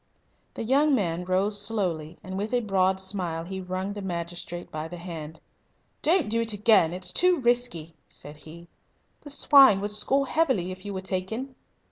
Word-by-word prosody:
The - - -4
young 280 +5 +3
man 180 -5 -2
rose 195 +3 +1
slowly, 175 -7 -3
and 190 0 -7
with 210 +5 -2
a 245 - +2
broad 190 -3 +1
smile 185 -4 -2
he 190 +2 -6
wrung 185 +2 -4
the 205 - -7
magistrate 175 -1 -6
by 155 +1 -5
the 175 +2 -9
hand. 160 -3 -8 0.6
"Don't 335 - +2
do 230 +2 0
it 225 -1 0
again. 210 -5 +4
It's 180 +1 -2
too 360 -2 +3
risky," 240 - 0
said 145 +1 -12
he. 165 +3 -12 0.5
"The 290 - -11
swine 275 -6 +6
would 205 +1 -2
score 265 +7 +3
heavily 260 - 0
if 185 +1 -10
you 205 - -5
were 190 - -3
taken." 195 +8 -4
190 Hz, 175 wpm, -26 LUFS, 175-230 Hz, 0.6 s, swine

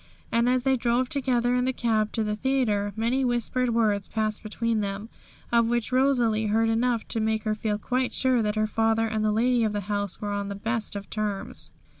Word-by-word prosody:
And 235 +1 +3
as 250 0 +2
they 265 0 +3
drove 245 +1 +1
together 245 -3 +1
in 250 0 +1
the 260 - +1
cab 220 -4 0
to 225 - 0
the 210 0 -1
theatre, 215 -5 0
many 235 +4 +1
whispered 245 0 0
words 215 -4 +1
passed 215 -1 -2
between 225 +1 -1
them, 200 +2 -4 0.4
of 235 -1 +4
which 240 0 -1
Rosalie 245 -5 +2
heard 225 +2 +2
enough 230 0 +1
to 225 - -1
make 220 0 0
her 215 - 0
feel 210 -1 -1
quite 250 +4 -1
sure 255 -2 +2
that 210 -1 -1
her 215 0 +2
father 225 +1 +1
and 220 -1 -1
the 215 - +2
lady 240 +2 +2
of 215 -1 0
the 205 - -1
house 205 -1 -3
were 205 -1 -3
on 200 0 -2
the 200 - -4
best 225 +1 -3
of 200 0 -6
terms. 210 -2 -3
225 Hz, 215 wpm, -26 LUFS, 215-245 Hz, 0.4 s, of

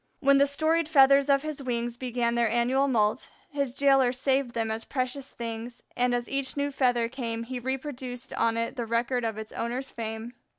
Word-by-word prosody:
When 275 -1 +4
the 280 - +5
storied 315 +3 +1
feathers 275 -1 +6
of 275 0 +4
his 305 -2 -5
wings 240 -2 -2
began 240 -1 -1
their 235 -1 +2
annual 245 +4 +2
moult, 220 -2 +1 0.2
his 280 -3 -1
jailer 270 -1 +4
saved 265 -1 0
them 225 -1 0
as 220 +1 -3
precious 260 +1 -3
things, 235 +1 -6
and 245 0 +2
as 240 0 -2
each 275 0 -3
new 285 0 0
feather 245 -4 +2
came 230 -2 -4
he 250 +1 -5
reproduced 260 -1 -5
on 230 0 +1
it 230 +3 -2
the 235 -2 -3
record 235 +2 0
of 225 -2 -2
its 220 0 -7
owner's 250 +3 -4
fame. 225 +1 -5
250 Hz, 195 wpm, -27 LUFS, 235-275 Hz, 0.2 s, feathers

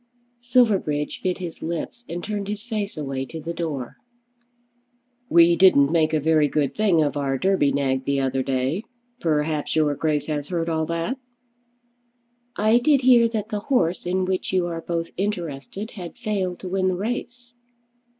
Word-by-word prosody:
Silverbridge 210 -12 +1
bit 185 -1 -1
his 175 -3 -7
lips 170 +8 -5
and 175 +1 -5
turned 205 -2 -3
his 210 0 -4
face 215 -6 -4
away 135 -3 -3
to 160 +5 -7
the 165 +2 -5
door. 155 -7 -4 1.3
"We 170 0 +6
didn't 160 -6 +5
make 160 -2 +3
a 155 - +2
very 155 0 +3
good 145 -2 0
thing 195 -7 +3
of 145 0 -1
our 135 -2 0
Derby 185 -3 +2
nag 135 -1 0
the 140 0 +1
other 135 0 0
day. 130 - -1 0.4
Perhaps 150 -3 0
your 155 -2 +3
Grace 150 0 0
has 145 -2 -3
heard 170 -1 -2
all 160 -1 0
that?" 170 +11 -2 1.4
"I 215 +3 +4
did 275 +2 +3
hear 245 -2 +6
that 220 -2 -3
the 210 -2 -2
horse 180 - 0
in 185 +1 +1
which 185 0 -2
you 185 -2 +2
are 165 -1 -4
both 165 0 -3
interested 190 - -4
had 180 0 -9
failed 200 -6 -2
to 185 - -5
win 185 0 +1
the 185 - +1
race." 240 +4 -5
170 Hz, 170 wpm, -23 LUFS, 150-205 Hz, 1.4 s, We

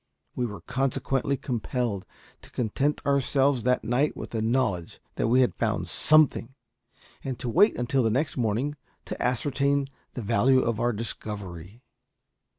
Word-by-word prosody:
We 125 - 0
were 105 -2 -8
consequently 135 +1 -1
compelled 120 -5 -2 0.3
to - - -14
content 135 +6 -1
ourselves 140 -1 +2
that 125 +2 +1
night 125 +7 +1
with - - -7
the 115 - -2
knowledge 110 -7 0
that - - -1
we 125 +3 +4
had 125 - +2
found 110 -1 -1
something, 150 -5 +3 0.7
and 130 -2 -4
to 125 - -5
wait 205 - +4
until 125 +2 +1
the 115 - +2
next 135 +7 0
morning 125 +5 -1 0.3
to - - -6
ascertain 140 +2 +1 0.2
the 125 - -5
value 130 +6 +3
of 115 -3 -1
our 120 +1 +2
discovery. 105 -2 -6
125 Hz, 150 wpm, -26 LUFS, 110-135 Hz, 0.7 s, we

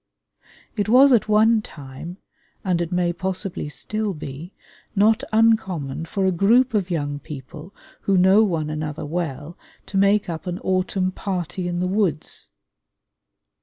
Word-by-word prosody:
It 210 -1 -1
was 260 +3 +7
at 220 -2 +2
one 220 +1 +4
time, 150 +1 -10 0.5
and 180 -2 +1
it 170 0 -3
may 175 -1 +1
possibly 185 -2 -4
still 210 +7 -3
be, 150 +4 -8 0.4
not 215 +2 +3
uncommon 190 -10 +1
for 195 +3 -1
a 190 - +3
group 230 +8 +3
of 195 -4 0
young 145 -4 -2
people 150 +5 -10 0.3
who 195 -1 +2
know 190 +4 +6
one 160 -7 -1
another 155 -1 -4
well 155 -1 -4 0.3
to 195 - -4
make 200 +1 +3
up 170 +1 -5
an 180 0 -2
autumn 185 0 0
"party 185 -2 -4
in 175 0 -2
the 180 - 0
woods." 185 -6 -1
180 Hz, 145 wpm, -22 LUFS, 160-205 Hz, 0.5 s, was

